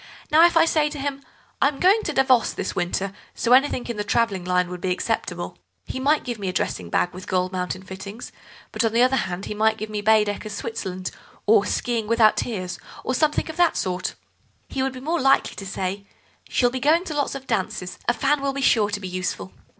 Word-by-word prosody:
Now 315 +2 +7
if 340 - 0
I 325 - +6
say 305 -2 +2
to 295 - -7
him: 280 0 -3 0.4
'I - - +6
am 280 -1 -3
going 390 +5 +5
out - - -7
to 310 - -1
Davos 260 -3 +3
this - - -4
winter, 190 +2 -1 0.2
so 240 - +2
anything 260 -1 +3
in 235 -3 -4
the 210 - -1
travelling 205 -3 +1
line 180 0 +1
would 180 -1 -7
be 185 - -1
acceptable,' 180 - -2 0.3
he - - -5
might 290 +3 +2
give 240 -3 -4
me 195 -2 -2
a - - -3
dressing 90 - -2
bag 175 - +1
with 185 +1 -9
gold 185 0 0
mounted 185 0 -4
fittings, 200 +5 -8 0.4
but, - - 0
on 225 -1 +1
the 235 +1 +5
other 255 +1 +3
hand, 190 -5 -2
he - - -4
might 220 +1 +2
give 215 0 -6
me 210 -1 -2
Baedeker's 210 -1 +2
Switzerland, 185 -5 -4 0.3
or 210 -1 +4
'Skiing 230 -3 -1
without 225 -1 +5
Tears,' 185 -6 -3 0.2
or 255 - -1
something 300 +3 +1
of 320 +1 -7
that 350 -1 +3
sort." 180 -1 -2 0.5
"He 265 - -2
would 265 0 0
be 255 - -8
more 325 +4 -1
likely 270 +1 +3
to 195 - -7
say: 195 +1 -4 0.4
'She'll 245 -1 +2
be 260 - -3
going 310 +6 +3
to 335 - -5
lots 285 -2 -1
of 270 -1 -7
dances, 190 -4 -3
a 240 - +4
fan 280 +1 +1
will 275 0 -1
be 275 - -3
sure 215 -5 +4
to 205 0 -3
be 190 - -6
useful. 180 - -4
220 Hz, 230 wpm, -23 LUFS, 190-270 Hz, 0.5 s, Now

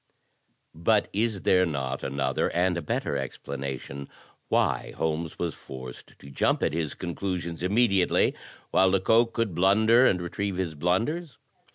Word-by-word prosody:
But 100 +6 +2
is 105 -1 -1
there 90 0 +4
not 65 -6 -2
another 70 -1 0
and 90 +1 +2
a 85 - -2
better 75 - -2
explanation 70 0 -6 0.4
why - - 0
Holmes 80 0 -2
was 85 -2 -2
forced 65 -2 -10
to 70 - -13
jump - - +1
at - - +1
his 80 -3 -2
conclusions 85 -1 -4
immediately, 100 -1 +3 0.4
while 95 - +4
Lecoq 110 +5 +3
could 115 -5 -1
blunder 110 +8 +5
and 90 - +2
retrieve 95 +2 -3
his 90 -4 -2
blunders? 115 - -1
90 Hz, 140 wpm, -27 LUFS, 70-100 Hz, 0.4 s, blunder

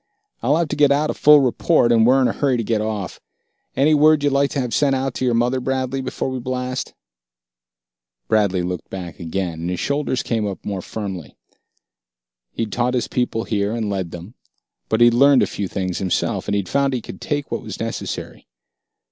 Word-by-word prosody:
I'll 140 +6 +2
have 170 -2 0
to - - -2
get 145 -1 +4
out 150 +2 +2
a - - -4
full 150 -1 +6
report, 130 0 +2
and 115 -1 +5
we're 130 +2 +5
in - - +4
a - - -1
hurry 135 -3 +1
to 115 - -1
get 110 -1 0
off. 105 -3 -4 0.6
Any 150 +3 +3
word 150 0 +5
you'd 145 -1 +2
like 140 0 +2
to 140 - -3
have 125 -3 -2
sent 140 -2 +2
out 135 0 -2
to 130 - -2
your 120 -2 +2
mother, 120 +3 +1
Bradley, 130 +1 -2
before 130 0 -3
we 130 - -3
blast?" 125 +1 -4 1.3
Bradley 100 -5 +2
looked 90 -1 -5
back 90 -4 -7
again, 85 -1 -3
and 85 - -3
his 90 - -3
shoulders 140 -2 -1
came 110 -3 -1
up 100 - -7
more 100 -2 -3
firmly. 95 -7 -6 1.2
He'd 110 -2 -3
taught 125 +4 0
his 125 - 0
people 120 -2 -1
here, 105 -2 -1
and 110 -3 -2
led 95 -3 -2
them; 90 +6 -10 0.6
but 110 +1 +1
he'd 120 0 +7
learned 140 +2 +5
a - - +3
few 100 - -4
things 95 -1 -3
himself 95 -2 -1
he'd 100 -2 -1
found 140 -1 +1
he 125 - -2
could - - -10
take 145 -1 -3
what - - -2
was - - -8
necessary. - - -5
120 Hz, 205 wpm, -21 LUFS, 100-135 Hz, 1.3 s, he'd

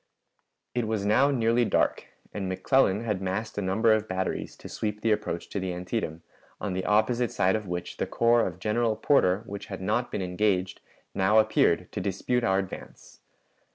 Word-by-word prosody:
It 120 -2 -1
was 110 -2 -1
now 130 +7 +4
nearly 120 -3 +2
dark, - - +1 0.3
and 95 -2 -3
McClellan 105 +1 +2
had 105 -5 -2
massed 95 +4 -3
a - - -1
number 110 +4 +3
of 110 0 0
batteries 95 0 -3
to - - -10
sweep 105 -1 -4
the 115 - +2
approach 85 -5 -2
to 100 - -3
the 95 -1 -3
Antietam, 90 -2 -4 0.4
on 100 -3 -3
the 95 0 -3
opposite 115 +3 +2
side 95 0 +2
of 105 -2 -4
which 90 0 -5
the - - -2
corps 115 0 +3
of 90 -2 -6
General 110 +3 0
Porter, 105 -5 +2
which 100 0 -7
had 95 - -6
not 110 +6 -1
been 95 - -2
engaged, 90 0 0 0.3
now 95 +3 +3
appeared 110 0 +3
to - - -4
dispute 110 +5 -1
our 95 -4 +2
advance. 95 -1 -7
105 Hz, 185 wpm, -27 LUFS, 95-115 Hz, 0.4 s, now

